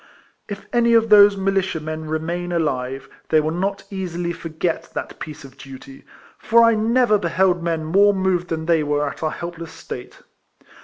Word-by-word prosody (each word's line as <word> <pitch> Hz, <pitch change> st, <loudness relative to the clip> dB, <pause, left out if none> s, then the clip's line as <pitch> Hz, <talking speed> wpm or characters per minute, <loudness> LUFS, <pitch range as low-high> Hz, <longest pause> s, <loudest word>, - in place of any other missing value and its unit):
If 205 Hz, -1 st, -7 dB
any 235 Hz, -1 st, +3 dB
of 225 Hz, 0 st, +3 dB
those 205 Hz, -1 st, +7 dB
militia 195 Hz, -3 st, 0 dB
men 155 Hz, +1 st, -6 dB
remain 170 Hz, +3 st, -3 dB
alive, 135 Hz, -5 st, -2 dB, 0.2 s
they 155 Hz, -, +4 dB
will 155 Hz, +1 st, -1 dB
not 195 Hz, +3 st, -2 dB
easily 175 Hz, -3 st, -3 dB
forget 165 Hz, +1 st, -4 dB
that -, -, -6 dB
piece 155 Hz, 0 st, -8 dB
of 135 Hz, -1 st, -14 dB
duty; 135 Hz, 0 st, -12 dB, 0.3 s
for 235 Hz, +1 st, +4 dB
I 230 Hz, 0 st, +5 dB
never 225 Hz, 0 st, +2 dB
beheld 180 Hz, 0 st, +1 dB
men 165 Hz, -2 st, -2 dB
more 200 Hz, +6 st, +4 dB
moved 190 Hz, -2 st, 0 dB
than 160 Hz, -2 st, -4 dB
they 165 Hz, -1 st, +2 dB
were 145 Hz, 0 st, 0 dB
at 140 Hz, -, -7 dB
our 160 Hz, -, 0 dB
helpless 170 Hz, 0 st, -8 dB
KIFLEMAN -, -, -6 dB
HAERIS. -, -, -22 dB
261 -, -, -31 dB
state. -, -, -22 dB
170 Hz, 190 wpm, -21 LUFS, 155-195 Hz, 0.3 s, those